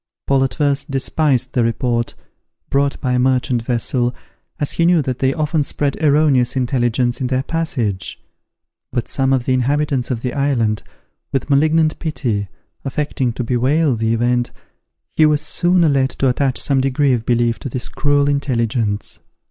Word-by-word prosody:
Paul 135 -1 +2
at 130 -2 -2
first 145 -2 0
despised 135 -1 0
the 120 - +2
report, 120 0 -1 0.6
brought 140 0 +1
by 130 - 0
a 125 - +2
merchant 125 -1 +1
vessel, 120 +1 -1 0.4
as 145 - -1
he 170 - +1
knew 175 -3 +4
that 130 -1 -3
they 135 0 +2
often 155 +1 0
spread 140 0 -1
erroneous 140 -4 +3
intelligence 125 -1 0
in 130 - 0
their 130 +1 0
passage; 125 - -2 0.7
but 120 - -2
some 135 -1 0
of 130 -2 +1
the 130 - +1
inhabitants 135 0 0
of 120 -3 -3
the 125 - -2
island, 125 -7 0 0.5
with 140 +1 -2
malignant 155 +2 +3
pity, 125 -10 -2 0.4
affecting 135 -2 -1
to 125 - -3
bewail 130 +4 +1
the 110 0 0
event, 120 +1 +1 0.6
he 155 - +5
was 150 -1 +2
soon 175 -1 +2
led 135 -1 +2
to 135 - -1
attach 130 +1 0
some 135 -2 +1
degree 135 +1 +2
of 120 -2 -1
belief 120 0 +1
to 135 - -5
this 120 0 -4
cruel 145 -1 +1
intelligence. 115 -6 -1
130 Hz, 165 wpm, -18 LUFS, 120-145 Hz, 0.7 s, he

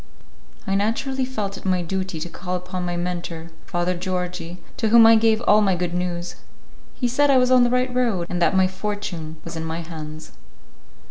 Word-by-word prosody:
I 195 - -1
naturally 245 +6 0
felt 210 -6 -4
it - - -12
my 185 -2 +1
duty 185 -1 -3
to 175 - -3
call 180 +1 -5
upon 180 0 -4
my 175 0 -2
mentor, 170 -2 -4 0.2
Father 175 0 0
Georgi, 180 -1 -4 0.2
to 220 - +1
whom 230 0 +8
I 225 0 +8
gave 220 0 +3
all 215 -2 +5
my 195 -3 +3
good 175 -1 -2
news. 175 -1 -3 0.6
He 245 - 0
said 285 +4 +2
I 270 - +6
was 250 0 +3
on 255 -1 +6
the 240 - +3
right 250 +1 +1
road, 230 -9 +1
and 180 0 -3
that 170 +3 +3
my 190 - +5
fortune 185 -5 -5
was 165 0 -7
in 160 - -4
my 160 +1 -3
hands. 155 -1 -8
185 Hz, 200 wpm, -23 LUFS, 175-220 Hz, 0.6 s, whom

